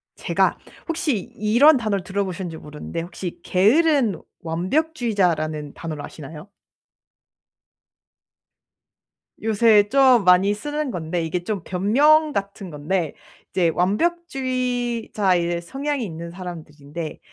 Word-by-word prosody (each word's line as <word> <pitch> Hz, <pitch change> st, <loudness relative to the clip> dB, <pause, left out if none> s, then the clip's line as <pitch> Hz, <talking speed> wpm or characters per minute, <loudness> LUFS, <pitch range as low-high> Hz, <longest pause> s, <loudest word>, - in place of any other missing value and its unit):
제가 -, -, +1 dB, 0.3 s
혹시 325 Hz, -, 0 dB, 0.2 s
이런 240 Hz, +9 st, +5 dB
단어를 210 Hz, -5 st, -1 dB
들어 200 Hz, +1 st, -1 dB
보셨는지 180 Hz, -3 st, -5 dB
모르는데 150 Hz, +2 st, -7 dB
혹시 175 Hz, +1 st, -7 dB
게으른 235 Hz, -, +3 dB, 0.2 s
완벽주의자라는 175 Hz, -, -1 dB
단어를 155 Hz, -3 st, -6 dB
아시나요? 155 Hz, +3 st, -10 dB, 3.0 s
요새 215 Hz, -1 st, +4 dB
좀 260 Hz, -3 st, +5 dB
많이 180 Hz, +2 st, +5 dB
쓰는 295 Hz, +7 st, -3 dB
건데 170 Hz, -4 st, -3 dB
이게 175 Hz, +2 st, -3 dB
좀 200 Hz, 0 st, -3 dB
변명 290 Hz, -, +3 dB
같은 200 Hz, -3 st, -4 dB
건데 155 Hz, +3 st, -2 dB, 0.4 s
이제 175 Hz, -3 st, +2 dB
완벽주의자의 240 Hz, -, 0 dB
성향이 275 Hz, +8 st, -3 dB
있는 170 Hz, -3 st, -6 dB
사람들인데 160 Hz, -3 st, -8 dB
195 Hz, 255 characters per minute, -22 LUFS, 170-250 Hz, 3.0 s, 이런